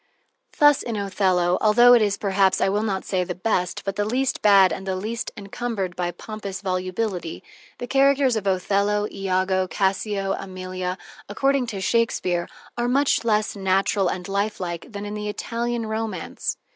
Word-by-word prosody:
Thus, 295 -2 +5
in 230 - -4
"Othello," 185 -3 +1
altho 240 +3 +6
that 240 -2 +7
is, 205 -1 +1
perhaps, 195 -1 +2
I - - +2
will 205 +2 0
not 200 -3 -2
say 185 -2 0
the 180 0 -5
best, 180 -2 -1
but 195 -1 -3
the 205 - +1
least 250 +5 -1
bad 195 -4 +6
and 190 0 -7
the 190 - -1
least 220 +5 -4
encumbered 200 -2 -4
by 175 -1 -1
pompous 200 +2 -7
volubility, 185 -1 -3 0.3
the - - -5
characters 275 -1 +3
of 205 -2 -2
Othello, 200 +2 +1
Iago, 185 -1 0
Cassio, 195 +1 -1
Emilia, 185 -1 -5 0.3
according 270 +4 +1
to 205 -4 -5
Shakespeare, 185 -6 0 0.3
are 240 - +1
much 275 +1 +2
less 215 -2 +1
natural 195 0 +1
and 180 +1 -3
lifelike 195 -4 -3
than 205 -2 -6
in 205 - -5
the 210 0 -4
Italian 235 +2 -3
romance. 220 0 -3
200 Hz, 160 wpm, -23 LUFS, 185-225 Hz, 0.3 s, that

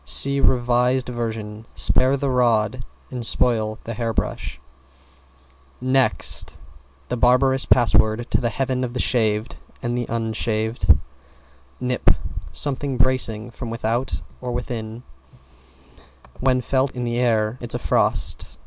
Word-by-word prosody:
See 140 0 +4
revised 125 0 +2
version, 110 -2 -5
"Spare 130 +2 +4
the 140 0 -1
rod 120 -1 +1 0.3
and 125 -2 -5
spoil 110 -2 +3
the 115 - -5
hair 115 0 -2
brush!" 65 - -3 1.2
"=NEXT=" 130 +1 +1 0.5
The 125 - -2
barberous 130 +2 +3
password 115 -1 +3
to - - +2
the 120 - 0
heaven 130 +2 -2
of 120 -1 -4
the - - -2
shaved 110 -3 0 0.2
and 120 0 -3
the 120 -1 -2
unshaved. 110 - +1 0.8
=NIP= 125 0 +1 0.4
Something 140 -2 -1
bracing 120 -3 +2
from 120 0 -7
without 115 +2 -2 0.2
or 125 -1 -4
within 120 -1 -5 1.4
When 130 -1 +2
felt 130 +2 +1
in 125 - -3
the 120 0 -1
air, 115 -1 +1
it's 120 -1 -1
a - - +1
frost. - - -1
120 Hz, 125 wpm, -22 LUFS, 115-130 Hz, 1.4 s, See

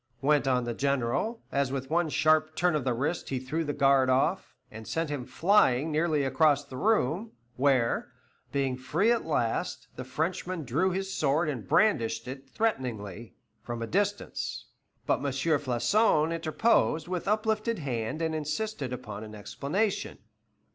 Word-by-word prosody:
went 145 -1 +3
on 125 -2 +2
the 120 0 -3
General, 140 - -1
as 140 -2 0
with 135 +1 -4
one 170 0 +2
sharp 155 +1 +2
turn 180 -1 +2
of 150 -3 0
the 125 -1 +1
wrist 145 +8 -2
he 135 - -1
threw 130 +6 -2
the 145 - -2
guard 135 -2 +3
off, 130 +1 +1 0.2
and 110 0 -9
sent 165 -2 -2
him 135 -4 -4
flying 155 -2 +3
nearly 155 -1 +1
across 145 +1 +3
the 135 - -10
room, 205 - +1 0.2
where, 130 -3 +1 0.4
being 135 -2 0
free 165 - +1
at 235 - +1
last, 120 -7 -1
the 130 - -4
Frenchman 165 +6 -3
drew 150 +10 +1
his 190 +1 -3
sword 155 0 +1
and 120 -10 -4
brandished 115 - +2
it 135 +1 -8
threateningly 120 - -3 0.3
from 120 -1 -5
a - - -1
distance. 205 - -2 0.4
But - - +2
M. 145 - -5
Floçon 150 - +2
interposed 165 0 +1
with 180 +1 -3
uplifted 220 +2 0
hand 130 0 -3
and 160 -1 0
insisted 155 - -3
upon 110 -5 -6
an 110 0 -9
explanation. 175 - -2
145 Hz, 155 wpm, -28 LUFS, 130-175 Hz, 0.4 s, went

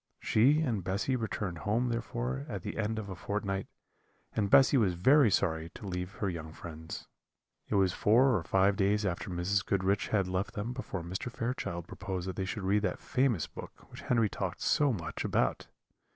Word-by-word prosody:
She 140 +8 +4
and 115 - -1
Bessy 100 +8 0
returned 105 -7 -3
home 115 +6 0
therefore 65 - -3
at - - -5
the - - -5
end 110 0 -1
of 110 -2 -4
a 95 - -6
fortnight, 100 0 -3 0.7
and 100 -2 +1
Bessy 135 +5 +6
was 100 -9 +3
very 130 - +5
sorry 80 -4 0
to - - -9
leave 90 0 -4
her 100 - -2
young 80 -3 -5
friends. 80 -1 -8 0.6
It - - -1
was 95 -2 +3
four 120 +6 +4
or 95 - +1
five 95 +4 +3
days 100 +2 +2
after 90 +3 -2
Mrs. 90 +3 0
Goodriche 100 0 +1
had 100 -4 +1
left 95 +2 -2
them 105 +4 -3
before 100 -8 -5
Mr. 95 +8 -4
Fairchild 115 -9 -3
proposed 95 -1 -5
that 95 - -4
they 95 - -2
should 95 +2 -4
read 100 +2 +2
that 95 -3 -1
famous 125 - +1
book - - -11
which - - -9
Henry 115 -3 +2
talked - - -4
so 145 -2 +3
much 85 -9 -4
about. - - 0
100 Hz, 190 wpm, -31 LUFS, 90-110 Hz, 0.7 s, Bessy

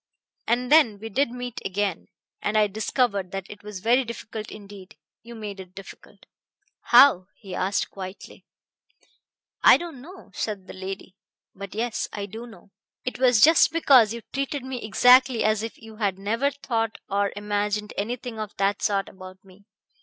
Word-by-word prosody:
And 245 +3 0
then 295 -10 +5
we 220 +2 -8
did 270 +5 +1
meet 245 0 -6
again, 195 -1 -2 0.3
and 210 +1 0
I 215 - +5
discovered 210 -1 -1
that 195 -1 -4
it 205 - -11
was 205 -3 -8
very 240 +5 +3
difficult 220 -2 -7
indeed. 200 -1 -12 0.2
You 235 +1 -11
made 210 -3 -7
it 185 0 -11
difficult." 195 - -13 0.6
"How?" 240 -7 +6
he 195 -4 -11
asked 195 +2 -1
quietly. 190 0 -9 1.2
"I - - +8
don't 330 -7 -8
know," 360 +7 -13
said 205 -4 -4
the - - -10
lady. 190 0 -7 0.4
"But 200 0 -9
yes 230 +1 -2
I 205 -1 -4
do 225 +4 -9
know. 220 -3 -16 0.3
It 250 - -4
was 250 -4 +4
just 325 +5 +6
because 265 -9 +5
you 235 0 -5
treated 275 0 -2
me 260 -2 -5
exactly 250 +3 +5
as 215 -1 +2
if 225 0 -6
you 220 -1 -13
had 200 -4 -1
never 225 +8 0
thought 230 -5 -3
or 200 0 0
imagined 210 0 -2
anything 230 +2 -4
of 215 -1 -6
that 200 +1 0
sort 195 -2 0
about 185 0 -13
me. 195 +1 -19
215 Hz, 170 wpm, -25 LUFS, 200-245 Hz, 1.2 s, I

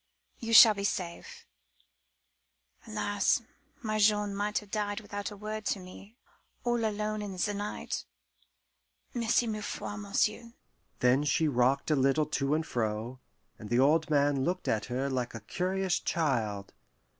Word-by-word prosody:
You 230 -1 -4
shall 225 -1 +10
be 200 -1 -5
safe. 200 - -4 1.4
Alas! 205 0 +1 0.4
my 215 -1 -1
Jean 210 -1 +3
might 205 +1 -1
have 210 -1 -5
died 205 0 -1
without 205 -1 -5
a 205 - -10
word 215 +1 -5
to 200 - 0
me 190 +4 -12 0.5
all 240 -1 0
alone 215 0 -1
in 200 -3 -6
the 205 +3 0
night. 205 +1 -4 1.1
Merci 240 -1 +2
mille 215 -2 -3
fois, 205 - -5
monsieur!" 215 +3 -1 0.5
Then 125 +3 +4
she 150 +2 +2
rocked 130 +2 +2
a - - +4
little 135 +3 +3
to 145 -1 0
and 160 0 -1
fro, 115 +1 -3 0.4
and 105 - -9
the 120 - +2
old 155 +5 +3
man 145 -2 +2
looked 180 +5 -2
at 110 0 0
her 130 +2 -2
like 125 -3 -2
a - - -5
curious 185 - -1
child. 110 -11 -1
190 Hz, 150 wpm, -30 LUFS, 135-210 Hz, 1.4 s, shall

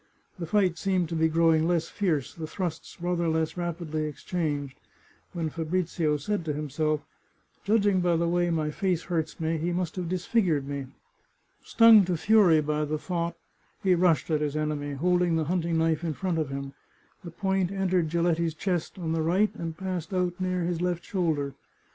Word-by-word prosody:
The 170 - -4
fight 185 -2 +2
seemed 185 -4 0
to 170 - -3
be 160 0 +3
growing 160 0 +3
less 170 -2 +1
fierce, 155 -9 -1
the 160 -2 -6
thrusts 175 -2 -5
rather 175 -1 0
less 160 -1 0
rapidly 170 -3 -3
exchanged, 145 -3 -3 0.5
when 165 -3 -3
Fabrizio 165 -1 -1
said 200 +6 -2
to 150 - -1
him 150 -1 -5
self, 155 +1 0 0.3
" - - -40
Judging 205 -3 +3
by 175 -1 +2
the 170 +1 +1
way 175 0 +1
my 155 -2 0
face 180 0 -1
hurts 160 -2 -3
me 160 0 -1
he 170 +3 -1
must 175 -2 -2
have 175 -2 -3
disfigured 180 - +1
me." 140 -2 -4 0.8
Stung 230 -3 +7
to 175 -1 -1
fury 185 -4 +5
by 150 0 -1
the 150 +1 -1
thought, 170 +1 -3 0.5
he 190 -2 +4
rushed 170 -4 +2
at 155 -1 +1
his 150 -1 -1
enemy, 150 -1 -2
holding 175 +3 +2
the 160 - +1
hunting 170 0 0
knife 160 0 +1
in 165 -2 -1
front 180 -4 -1
of 155 -3 -1
him. 140 0 -5 0.5
The 175 - -7
point 190 +1 -1
entered 185 -4 +1
Giletti's 170 -1 +1
chest 175 0 -2
on 165 -3 -3
the 165 0 0
right, 185 +7 +2
and 165 -1 -6
passed 185 -1 -4
out 180 0 -1
near 185 -1 0
his 170 0 -2
left 175 -1 -1
shoulder. 155 -7 -1
170 Hz, 185 wpm, -27 LUFS, 155-180 Hz, 0.8 s, Stung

